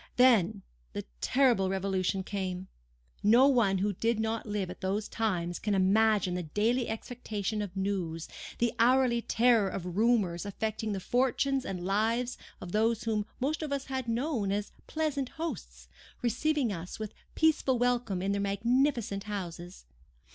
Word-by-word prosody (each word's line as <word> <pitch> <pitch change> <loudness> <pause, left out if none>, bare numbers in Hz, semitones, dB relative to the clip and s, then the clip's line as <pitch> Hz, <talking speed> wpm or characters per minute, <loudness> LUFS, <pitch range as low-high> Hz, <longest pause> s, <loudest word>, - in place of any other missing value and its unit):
Then 220 -6 +4 0.3
the - - -4 0.2
terrible 245 -8 +3
Revolution 190 0 0
came. 190 -2 -4 0.5
No 235 +6 +6
one 230 -8 +3
who 200 +2 0
did 225 +4 0
not 225 0 -2
live 205 -3 -2
at 185 - -11
those 200 +3 -1
times 175 -6 -1
can 210 -2 0
imagine 200 0 +3
the 180 - -1
daily 220 +9 0
expectation 220 -2 -3
of 195 -2 -6
news—the 190 +4 -2
hourly 245 0 +4
terror 230 -4 +3
of 180 -2 -5
rumours 210 -6 +2
affecting 215 +1 -3
the 195 - -2
fortunes 265 +4 +1
and 180 -2 -4
lives 225 +5 +1 0.2
of 175 - -8
those 225 +2 +1
whom 215 -2 -1
most 290 +5 -1
of 305 -2 -4
us 280 -1 -2
had 260 -2 -3
known 230 -3 0
as 205 +1 -2 0.2
pleasant 290 -4 -1
hosts, 175 - -5 0.4
receiving 250 0 +1
us 175 0 -6
with 215 -1 -6 0.2
peaceful 305 -5 +3
welcome 240 -6 0
in 195 - 0
their 200 0 0
magnificent 220 +1 +1
houses. 180 - -6
215 Hz, 145 wpm, -30 LUFS, 195-245 Hz, 0.5 s, No